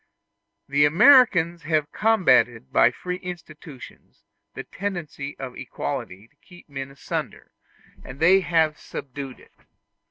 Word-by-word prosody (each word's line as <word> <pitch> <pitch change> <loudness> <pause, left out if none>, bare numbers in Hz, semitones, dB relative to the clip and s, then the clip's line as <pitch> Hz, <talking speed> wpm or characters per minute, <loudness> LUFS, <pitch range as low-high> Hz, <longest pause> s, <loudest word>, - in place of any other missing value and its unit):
The 140 +1 +2
Americans 175 - +5
have 155 -3 -1
combated 135 - +2
by - - +5
free 180 +8 -6
institutions 165 -6 -11 0.3
the - - -6
tendency 170 -7 -6
of 130 -2 -7
equality 95 +4 -6
to 145 - -37
keep 175 +2 -18
men 135 -2 -7
asunder, 135 - -6 0.5
and 130 - -11
they 180 +4 +5
have 160 -4 +1
subdued 135 -1 -8
it. - - -21
155 Hz, 120 wpm, -23 LUFS, 135-180 Hz, 0.5 s, Americans